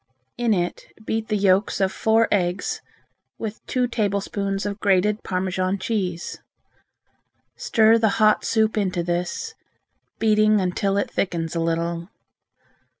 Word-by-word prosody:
In 240 -1 0
it 175 -4 -1 0.2
beat 220 0 -2
the 215 - 0
yolks 195 +1 +2
of 190 -1 +2
four 225 +1 +2
eggs 180 -1 0 0.6
with 220 -1 -6
two 255 -1 +1
tablespoons 200 -3 -2
of 205 0 -3
grated 205 +2 +2
Parmesan 185 +1 -1
cheese. 190 -4 -3 1.2
Stir 225 0 +4
the 220 -1 +3
hot 215 -1 +4
soup 220 -1 +1
into 185 -4 -1
this, 175 - -3 0.6
beating 215 -1 +3
until 195 +2 0
it 200 - -1
thickens 170 -3 -2
a - - 0
little. 165 +1 -1
200 Hz, 125 wpm, -23 LUFS, 180-215 Hz, 1.2 s, Stir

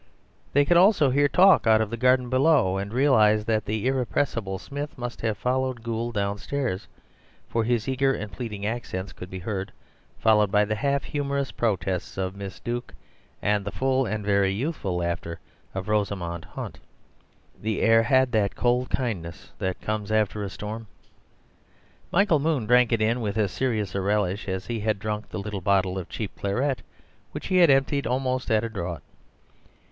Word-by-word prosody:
They 145 +1 +4
could 175 +3 +4
also 175 -7 +5
hear 145 +2 +4
talk 185 -2 +5
out 110 -1 +6
of 110 -1 -1
the - - -1
garden 125 +1 +3
below; 130 -7 +3
and 100 +1 -4
realized 110 -5 +4
that 110 -2 0
the 110 +2 -2
irrepressible 120 -6 0
Smith 145 +7 -6
must 120 -1 -5
have 110 -3 -1
followed 130 0 -1
Gould 115 0 -3
downstairs, 100 +2 -2 0.6
for 115 - 0
his 120 0 0
eager 135 +1 +2
and 105 -5 -4
pleading 105 -5 -5
accents 105 -4 -4
could 90 - -9
be 95 - -6
heard, 95 0 -4 0.5
followed 105 -3 +3
by 105 0 +4
the 110 - -1
half 140 +5 0
humourous 140 -1 -2
protests 95 -6 -2
of 95 0 -2
Miss 100 -1 -7
Duke 120 +1 -5 0.5
and 105 -1 +2
the 100 - -4
full 130 +1 +1
and 105 0 -3
very 100 -1 +3
youthful 100 - -2
laughter 85 -1 -3 0.4
of 95 +1 -4
Rosamund 100 -5 -1
Hunt. - - -7 0.8
The 110 0 -1
air 115 0 +5
had 130 +1 +3
that 105 -3 +1
cold 125 +1 +1
kindness 95 -10 -4
that 95 -1 -2
comes 105 -1 -3
after 110 -1 +1
a 100 - -3
storm. 110 +3 -6 1.2
Michael 185 -4 +4
Moon 145 -5 0
drank 125 +1 +4
it 115 -2 +2
in 115 +3 +1
with 105 -1 -2
as 105 -4 +1
serious 110 -6 -1
a 100 - -1
relish 100 0 0
as 95 -1 -3
he 115 0 -3
had 110 0 0
drunk 105 +1 -4
the - - -5
little 100 -1 -4
bottle 95 -2 +1
of 90 - -8
cheap 105 -4 -5
claret, 125 +7 0 0.5
which - - -6
he 185 - +1
had 175 -3 +7
emptied 135 +1 +2
almost 130 0 -1
at 110 0 +3
a 115 - -2
draught. 85 -7 -5
110 Hz, 175 wpm, -25 LUFS, 100-130 Hz, 1.2 s, had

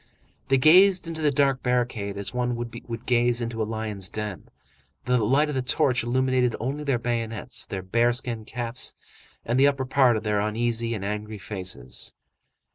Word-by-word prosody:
They 135 - +4
gazed 180 +6 +6
into 160 -1 -5
the 150 - +3
dark 135 -1 +2
barricade 120 -5 -1
as 100 +2 -3
one 125 0 0
would 120 0 -5 0.3
gaze 120 -1 +2
into 115 -1 -3
a - - +1
lion's 110 -4 -2
den. 105 -3 -6 0.6
The 125 0 +2
light 135 +8 +3
of 150 - -3
the 130 - 0
torch 125 -1 +1
illuminated 125 0 +1
only 135 +6 -3
their 140 -4 +1
bayonets, 115 -2 -3
their 95 -2 -5
bear 115 +6 +2
skin 120 -2 -2
caps, 120 +2 -3 0.5
and 120 +3 +1
the 140 - +6
upper 140 -2 0
part 130 -3 +4
of 110 - -5
their 105 -1 +1
uneasy 115 +2 -1
and 100 -2 -5
angry 105 +1 -4
faces. 90 - -6
120 Hz, 175 wpm, -25 LUFS, 110-130 Hz, 0.6 s, gazed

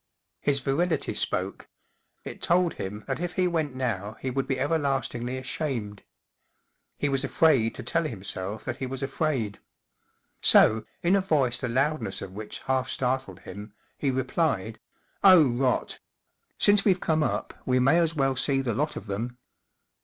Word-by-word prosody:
His 140 -1 +3
virility 160 +4 0
spoke: - - -2 0.5
it - - -8
told 175 0 +2
him 105 +3 -6
that 135 +1 -3
if 175 0 -3
he 185 0 +1
went 160 -6 -1
now 110 -5 -3
he 130 - -3
would 135 +1 -2
be 135 -1 -1
everlastingly 135 -4 -1
ashamed. 125 -6 -3 1.0
He 145 - 0
was 135 -1 0
afraid 135 -5 +3
to - - -7
tell 165 -1 +1
himself 100 -4 -4
that - - -3
he 130 - -4
was 135 +1 -5
afraid. 135 -7 -1 0.8
So, 110 0 +6 0.2
in 175 +3 +4
a 200 - +3
voice 135 -9 +1
the 125 - -3
loudness 135 -3 0
of 95 - -8
which 105 +1 -6
half 130 -1 0
startled 125 -8 -2
him, 100 +3 -9 0.2
he 140 - -1
replied: 125 - -1 0.4
44 195 - +8
Oh, 165 - +7
rot! 125 +1 0 0.6
Since 205 -1 +5
we've 190 -3 +3
come 160 -2 +1
up - - -1
we 130 0 +1
may 135 +7 +4
as 165 -1 +1
well 135 -2 +1
see 135 +1 +1
the 125 -3 -1
lot 150 +7 -1
of - - -7
them." 115 +5 -4
135 Hz, 165 wpm, -27 LUFS, 115-155 Hz, 1.0 s, 44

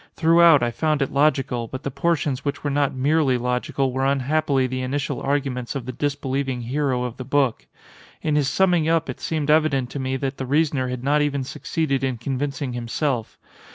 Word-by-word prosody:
Throughout 165 -4 +6
I 120 - +1
found 150 +4 0
it - - -5
logical, 135 -5 +1
but 130 +3 -7
the 140 - -3
portions 140 -2 0
which 140 - -3
were 145 - -1
not 140 -1 +1
merely 140 0 +2
logical 125 +2 -1
were 130 +1 -1
unhappily 140 0 +1
the 130 0 -3
initial 135 +2 -2
arguments 135 -3 -2
of 130 -4 -4
the 130 - -4
disbelieving 135 -2 -2
hero 130 +1 -1
of 125 -2 -5
the 130 - -5
book. 135 -2 0 0.6
In 155 -2 +1
his 145 -2 +2
summing 175 -1 +2
up 165 -1 +1
it - - -11
seemed 155 -2 -1
evident 150 -5 +2
to 140 - -4
me 130 0 -1
that 135 0 -3
the 130 - -4
reasoner 145 -2 +1
had 125 -1 -5
not 145 +2 +2
even 140 -2 0
succeeded 135 0 -2
in 130 -2 -1
convincing 140 +1 -3
himself. 120 0 -2
140 Hz, 190 wpm, -23 LUFS, 130-150 Hz, 0.6 s, Throughout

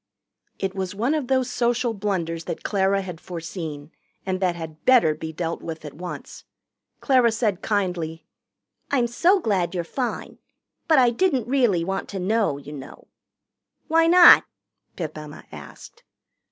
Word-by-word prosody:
It 195 -1 -3
was 190 0 -4
one 235 +8 0
of 300 -5 -2
those 260 -1 +1
social 240 0 0
blunders 175 -5 -3
that - - -5
Clara 195 -1 +1
had 180 -3 -8
foreseen 165 -3 -7 0.3
and 185 -1 -2
that 180 -2 0
had 160 -2 -9
better 245 -12 +5
be 160 +1 -7
dealt 165 +1 -4
with 160 -1 -7
at 150 - -8
once. 180 +2 -8 0.6
Clara 255 -4 +4
said 215 -4 -1
kindly: 175 -6 -2 0.6
"I'm 260 -4 +2
so 345 - +3
glad 195 - -1
you're 175 - -1
fine. 245 +8 -4 0.5
But 315 -3 +5
I 250 -2 +5
didn't 265 -2 0
really 240 -10 +2
want 195 +1 -3
to 195 - -5
know, 205 -5 +1
you 145 +1 -10
know." 135 -2 -11 0.8
"Why 330 +1 +4
not?" 350 +1 +9 0.5
Pip 160 -4 -5
Emma 150 -1 -10
asked. - - -12
195 Hz, 155 wpm, -23 LUFS, 165-240 Hz, 0.8 s, not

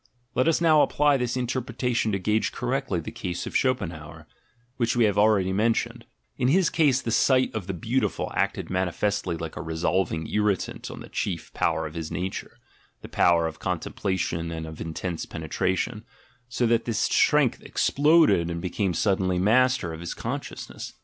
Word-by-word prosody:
Let 130 +4 +2
us 165 - +3
now 160 -3 +5
apply 145 -1 +3
this 125 0 -2
interpretation 125 -2 -1
to 100 - 0
gauge 105 +3 0
cor 125 - -4
rectly 135 -9 -1
the - - -7
case 90 -1 -4
of - - -7
Schopenhauer, 85 - -2 0.5
which 120 0 +1
we 120 - +4
have 105 -3 +2
already 100 -3 +3
mentioned: 115 +3 0 0.3
in 125 - +1
his 170 +4 +3
case, 145 -6 +3
the 115 - -2
sight 130 +2 +3
of 105 -5 -4
the 95 - -2
beautiful 115 +10 -1
acted - - -1
manifestly 95 0 -1
like 80 -1 -6
a - - -5
resolving 80 0 -1
irritant 105 -2 -1
on - - -8
the - - -9
chief 90 -5 -4
power - - 0
of 75 - -7
his 80 -1 -5
nature 95 +1 -4 0.5
(the - - -9
power 85 -1 +3
of 80 -1 -5
contemplation 85 -3 -2
and 80 -1 -5
of 80 -1 -9
intense 80 +1 -4
penetration); 95 +7 -2 0.5
so 125 0 0
that 115 0 +2
this 115 -2 -2
strength - - +3
exploded 150 - +3
and 85 0 -3
became 90 +1 -1
suddenly 95 -2 +1
master 115 -1 +2
of 80 - -7
his 85 - -5
consciousness. - - -6
105 Hz, 170 wpm, -26 LUFS, 85-125 Hz, 0.5 s, now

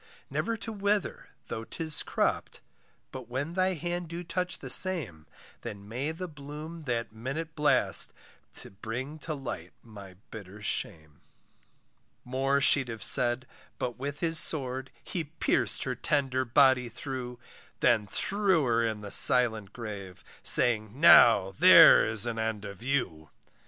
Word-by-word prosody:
Never 230 0 -3
to 225 - -7
wither 205 0 -3 0.2
though 110 - -7
'tis 155 +5 +3
cropped, - - -3 0.5
But 130 -3 -10
when 140 +6 -5
thy 185 0 0
hand 175 +1 -5
do 170 +2 -8
touch 180 +1 -4
the - - -10
same, 135 - +1 0.3
Then 100 0 -9
may 130 +8 -4
the 180 +3 -7
bloom 150 +2 -10
that 120 -3 -4
minute 140 +8 -6
blast 150 -1 +1 0.4
To - - -10
bring 120 +9 -7
to 155 +1 -6
light 135 -3 -8
my 100 -5 -14 0.2
bitter 105 -2 -11
shame. 80 -6 -5 1.0
More 135 +2 -1
she'd 135 -1 +4
have 115 -2 -7
said, 120 +2 +3 0.3
but 125 0 -5
with 140 +2 -6
his 165 -1 +2
sword, 135 -4 +1
He 175 -5 -5
pierc'd - - 0
her - - -3
tender 135 -3 -2
body 130 -1 +2
through; 125 0 -8 0.4
Then 115 -4 +1
threw 195 - -1
her 115 -1 0
in 110 -2 -3
the 100 -1 -9
silent 110 -5 +5
grave, 100 -6 -9 0.2
Saying, 115 0 +4
now, 115 - +6
there - - +7
is 110 0 +4
an 115 -1 -4
end 110 -2 -4
of 100 0 -10
you. 115 - -3
130 Hz, 145 wpm, -27 LUFS, 110-155 Hz, 1.0 s, there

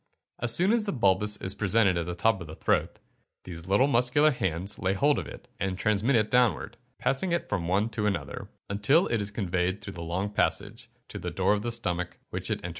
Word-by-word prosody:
As 120 -1 0
soon 185 - +2
as 230 -3 +1
the 200 - -1
bolus 105 -3 +2
is 95 - -3
presented 100 -2 +2
at 85 -1 -2
the 90 - -3
top 100 +2 +2
of 85 - -7
the 80 - -9
throat, - - 0 0.5
these 85 -1 -8
little 100 +7 +4
muscular 140 +3 +3
hands 95 - -3
lay 95 0 +1
hold 145 +8 +2
of - - -6
it, - - -11
and 95 -1 -2
transmit 110 +6 +2
it 110 -2 +2
downward, 125 -9 +2 0.2
passing 135 +9 0
it 170 - 0
from 90 -5 -2
one 100 +5 +2
to 105 -1 -1
another, 85 -9 -3 0.2
until 120 - +3
it 115 -3 +1
is 100 - -2
conveyed 95 -2 -1
through 100 -1 -8
the 85 - -8
long 90 +5 -2
passage, - - -1 0.2
to - - -7
the - - -4
door - - +2
of 105 - -1
the 120 +2 -2
stomach, 90 -7 -3
which - - -4
it - - -1
enters. 90 - -4
105 Hz, 225 wpm, -28 LUFS, 95-120 Hz, 0.5 s, little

